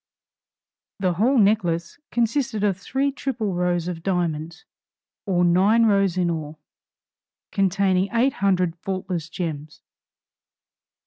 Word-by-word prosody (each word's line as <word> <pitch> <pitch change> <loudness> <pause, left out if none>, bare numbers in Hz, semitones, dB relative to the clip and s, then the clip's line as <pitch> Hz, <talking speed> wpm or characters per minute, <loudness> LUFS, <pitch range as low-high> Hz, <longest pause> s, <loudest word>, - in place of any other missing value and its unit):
The 185 -3 0
whole 235 +10 +2
necklace 180 - +1
consisted 235 -2 0
of 200 -2 +2
three 270 +9 -1
triple 250 -7 -3
rows 175 -1 0
of 175 -2 -4
diamonds, 170 -2 -2 0.6
or 180 -2 +2
nine 200 +7 +4
rows 195 -4 +2
in 175 -2 +1
all, 155 -1 -5 0.9
containing 195 -1 +1
eight 245 +4 +2
hundred 185 -3 +1
faultless 180 -3 -4
gems. 155 -3 -6
185 Hz, 110 wpm, -23 LUFS, 170-210 Hz, 0.9 s, nine